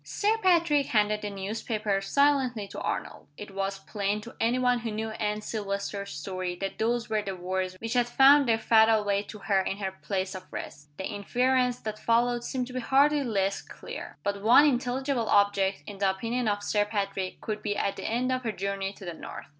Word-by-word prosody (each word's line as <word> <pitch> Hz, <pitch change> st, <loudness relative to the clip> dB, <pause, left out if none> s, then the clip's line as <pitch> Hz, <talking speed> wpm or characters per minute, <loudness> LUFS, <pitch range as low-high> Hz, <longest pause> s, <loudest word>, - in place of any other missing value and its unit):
Sir 425 Hz, +2 st, +1 dB
Patrick 335 Hz, -7 st, +3 dB
handed 210 Hz, -1 st, +2 dB
the 210 Hz, -, -3 dB
newspaper 205 Hz, +1 st, -2 dB
silently 260 Hz, -3 st, +2 dB
to -, -, -7 dB
Arnold. -, -, -4 dB
It 210 Hz, -1 st, -8 dB
was 195 Hz, 0 st, -2 dB
plain 200 Hz, +1 st, -2 dB
to 235 Hz, -, -11 dB
any 235 Hz, +2 st, +2 dB
one 250 Hz, -1 st, +2 dB
who 230 Hz, -1 st, -4 dB
knew 220 Hz, +1 st, -3 dB
Anne 210 Hz, -1 st, -2 dB
Silvester's 200 Hz, -2 st, -4 dB
story 180 Hz, +4 st, -4 dB
that 195 Hz, +2 st, -5 dB
those 235 Hz, +1 st, 0 dB
were 215 Hz, -1 st, 0 dB
the 195 Hz, -2 st, -5 dB
words 185 Hz, +1 st, -3 dB
which 225 Hz, 0 st, -3 dB
had 245 Hz, -1 st, +2 dB
found 275 Hz, +2 st, +6 dB
their 225 Hz, -, +4 dB
fatal 220 Hz, -1 st, +4 dB
way 200 Hz, -1 st, +1 dB
to 210 Hz, +1 st, -10 dB
her 200 Hz, -1 st, +1 dB
in 195 Hz, +1 st, -3 dB
her 195 Hz, -2 st, -3 dB
place 190 Hz, 0 st, -3 dB
of 185 Hz, -1 st, -9 dB
rest. 145 Hz, +1 st, -8 dB
The 190 Hz, -, -4 dB
inference 250 Hz, +5 st, +1 dB
that 215 Hz, -1 st, -5 dB
followed 240 Hz, +1 st, +2 dB
seemed 255 Hz, 0 st, -2 dB
to 250 Hz, -, -10 dB
be 255 Hz, -, -2 dB
hardly 285 Hz, +3 st, +3 dB
less 200 Hz, -5 st, 0 dB
clear. -, -, -9 dB
But 200 Hz, 0 st, -2 dB
one 235 Hz, +7 st, +7 dB
intelligible 255 Hz, -2 st, 0 dB
object, 200 Hz, -1 st, +2 dB
in 200 Hz, -2 st, -9 dB
the 195 Hz, -1 st, +3 dB
opinion 230 Hz, +5 st, -2 dB
of 205 Hz, -1 st, 0 dB
Sir 205 Hz, 0 st, +1 dB
Patrick, 195 Hz, -3 st, -3 dB
could 215 Hz, -1 st, -4 dB
be 205 Hz, -1 st, -2 dB
at 200 Hz, -, 0 dB
the -, -, -4 dB
end 250 Hz, +3 st, 0 dB
of 255 Hz, 0 st, 0 dB
her 230 Hz, -3 st, -2 dB
journey 195 Hz, -1 st, -3 dB
to 195 Hz, -, -12 dB
the 175 Hz, -, -4 dB
north. -, -, -8 dB
210 Hz, 210 wpm, -28 LUFS, 195-245 Hz, -, one